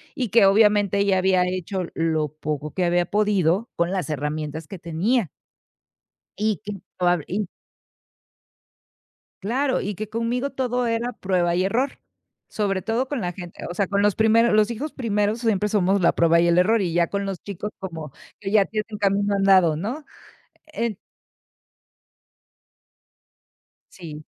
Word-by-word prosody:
y 250 -4 -2
que, 225 0 +5
obviamente, 205 0 +4
ella 200 -1 +3
había 185 -1 +3
hecho 185 +1 -3
lo 160 -2 0
poco 150 -1 -4
que 185 - 0
había 175 0 +2
podido 205 0 +1
con 170 +1 0
las 185 -4 -2
herramientas 150 +1 -4
que 195 - -8
tenía. 175 - 0 1.1
Y 215 -1 0
que 205 -2 -6 0.2
probable 175 -3 +1
y 200 +3 -2 2.0
Claro, 260 +7 0
y 205 +1 -3
que 215 +2 -6
conmigo 235 +4 -1
todo 250 -2 -1
era 235 +2 -1
prueba 180 -2 0
y 180 +1 +1
error, 250 +8 0 0.5
sobre 195 -3 -1
todo 235 +4 -1
con 275 -5 -3
la 175 -1 -2
gente, 175 -1 -9
o - - -3
sea, 195 +3 0
con 200 +1 0
los 205 -1 +3
primeros 225 +2 +4
los 215 +1 +3
hijos 280 +7 -4
primeros 210 -3 0
siempre 210 -3 +1
somos 195 -1 +2
la 170 - +4
prueba 170 0 +4
y 170 - +3
el 170 +1 +3
error, 215 +4 +3
y 175 -3 -1
ya 170 0 +2
con 200 +3 -3
los 195 -3 -5
chicos 200 +1 -5
como 165 -7 -7 0.3
que 195 - -5
ya 205 -2 +4
tienen 215 -1 -4
camino 200 0 +1
andado, 190 -5 +4
¿no? 235 - -4 0.6
Ent 235 -9 -3 2.9
Sí. 155 -4 -10
200 Hz, 155 wpm, -23 LUFS, 175-220 Hz, 2.9 s, que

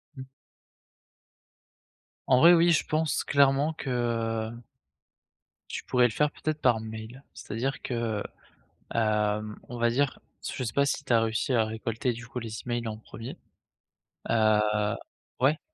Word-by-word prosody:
Mmh. 130 -1 -8 2.0
En 130 -1 +5
vrai, 170 +5 +9
oui, 170 0 +5
je 160 - +2
pense 155 0 0
clairement 140 +2 +3
que 115 -5 -1 1.2
tu - - -5
pourrais 125 -1 +3
le - - -5
faire, 150 +6 +1
peut-être, 155 0 -3
par 120 -3 +4
mail. 110 +4 -8
C'est-à-dire 125 +6 -4
que, 115 -4 -2 0.7
hem, 105 -1 +1
on 120 - -7
va 120 0 +3
dire, 135 +3 0 0.2
s - - -3
je - - -3
sais 110 -3 -3
pas 140 - +3
si 140 - -1
tu 125 - 0
as 115 - +5
réussi 115 +4 0
à 115 -2 +3
récolter, 115 +3 -2
du 120 +1 -9
coup, 125 - -5
les 115 -2 -6
emails 120 -1 -2
en 110 -1 -4
1er, 115 +2 -9 0.9
heu, 110 -2 +4 0.8
ouais? 140 +4 +3
120 Hz, 150 wpm, -28 LUFS, 110-135 Hz, 2.0 s, vrai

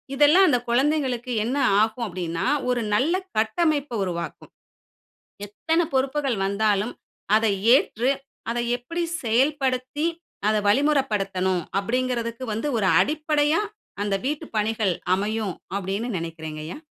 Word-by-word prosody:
இதெல்லாம் 300 +7 +6
அந்த 250 - +4
குழந்தைகளுக்கு 255 -1 +1
என்ன 255 +5 -1 0.2
ஆகும்? 220 +2 0
அப்படினா, 170 -3 -3 0.2
ஒரு 245 -1 +1
நல்ல 280 +10 +2 0.2
கட்டமைப்ப 290 +5 +1
உருவாக்கும். 170 -2 -5 1.0
எத்தன 325 +11 0
பொறுப்புகள் 265 -2 0
வந்தாலும், 205 +2 +1 0.4
அதை 220 -2 +2 0.2
ஏற்று 245 +2 0 0.4
அதை 240 +1 -1 0.2
எப்படி 335 +8 -4 0.2
செயல்படுத்தி 260 +3 0 0.4
அதை 215 0 +3
வழிமுறைப்படுத்தணும்? 205 - +1 0.2
அப்படிகிறதுக்கு 235 +2 -2
வந்து 225 +7 -2
ஒரு 200 -4 +1
அடிப்படையா 300 - +1 0.4
அந்த 205 -1 0
வீட்டுப் 300 +1 -3
பணிகள் 215 -2 +1 0.2
அமையும் 205 0 -1 0.2
அப்படினு 200 +4 -2
நெனைக்கிறேங்கய்யா. 160 - -6
235 Hz, 105 wpm, -24 LUFS, 200-280 Hz, 1.0 s, இதெல்லாம்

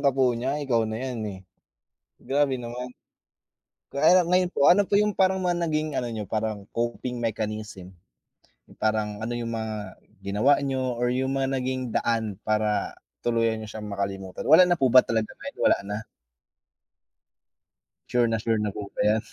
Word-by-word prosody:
ka 140 - +4
po 130 -2 +2
niya, 130 +5 -2
ikaw 115 -4 +1
na 110 - -3
yan, 125 -1 -4
eh. 95 - -7 0.8
Grabe 135 -2 0
naman. 125 +1 -6 1.0
Kaya 170 +6 +5
lang - - -6
ngayon 180 0 +3
po, - - -2
ano 205 +3 +5
po 200 - +1
yung 210 +1 +3
parang 190 -1 +2
mga 175 -1 +1
naging 155 0 -1
ano 120 - -3
niyo, 110 -2 -4
parang 110 0 -2
coping 120 +1 -3
mechanism? 110 -4 -4 0.8
Yung - - -19
parang 105 -1 0
ano 120 +2 -3
yung 115 -1 -4
mga 110 -3 -5 0.2
ginawa 105 +9 +3
niyo 130 -2 -1
or 125 0 +1
yung 130 +1 -1
mga 135 0 0
naging 130 -2 -2
daan 110 -3 0
para 105 -1 0 0.3
tuluyan 115 -2 +1
niyo 110 - -8
siyang 110 -1 -7
makalimutan? 95 -2 -4
Wala 160 +4 +9
na 175 - +3
po 130 - +4
ba 130 +1 +8
talaga 110 -1 -1
ngayon, 280 0 -9
wala - - +4
na? 105 0 -3 2.1
Sure 120 -1 +3
na 115 0 0
sure 115 0 0
na 105 -1 -1
po 100 -1 -6
ba - - -4
'yan? 110 +1 +3
120 Hz, 175 wpm, -26 LUFS, 110-135 Hz, 2.1 s, Wala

